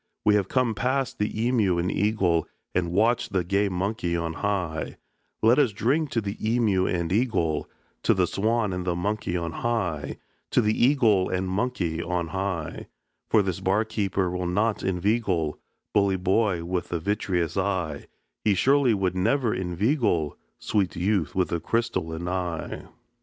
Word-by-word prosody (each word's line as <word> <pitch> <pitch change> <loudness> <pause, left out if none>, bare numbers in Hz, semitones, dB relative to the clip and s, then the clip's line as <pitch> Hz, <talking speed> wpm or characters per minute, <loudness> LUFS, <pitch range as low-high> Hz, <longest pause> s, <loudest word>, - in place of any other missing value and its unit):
We 105 - +5
have 100 -3 +2
come 125 -1 +1
past 130 +4 -1
the 105 - +1
emeu 110 -5 +1
and 90 +2 0
eagle, 95 -5 +1 0.3
And 90 -1 0
watched 115 +3 +2
the 95 -2 +2
gay 100 +3 +1
monkey 90 -2 -1
on 85 -1 -2
high; 90 -5 -2 0.5
Let 115 +5 +5
us 130 -8 +3
drink 140 +9 +1
to 115 - 0
the 100 +1 -4
emeu 110 -5 +1
and 85 -1 -1
eagle, 100 -9 0 0.3
To - - +3
the - - +3
swan 110 -1 0
and 90 0 -3
the 90 -1 -1
monkey 90 0 -1
on 85 -1 -3
high, 85 -11 -2 0.3
To - - +3
the 105 -1 +2
eagle 115 -8 +3
and 95 0 -1
monkey 95 -5 -1
on 85 -1 -2
high; 95 -4 -3 0.4
For 110 -2 +4
this 95 -2 -2
bar 95 +3 +1
keeper 100 -4 -1
will 90 0 -2
not 105 +5 +1
inveigle, 95 -4 0 0.3
Bully 100 -2 +3
boy 95 -1 +1
with 90 +1 -3
the 85 - -1
vitreous 90 -2 -1
eye, 95 -7 -1 0.4
He 105 -2 +3
surely 135 +1 +4
would 95 -2 0
never 115 +5 +1
inveigle, 90 - 0 0.2
Sweet 100 -4 0
youth 90 -1 0
with 95 -1 +1
the 85 - -1
crystalline 90 -5 -2
eye." 90 -3 -3
95 Hz, 160 wpm, -26 LUFS, 90-110 Hz, 0.5 s, We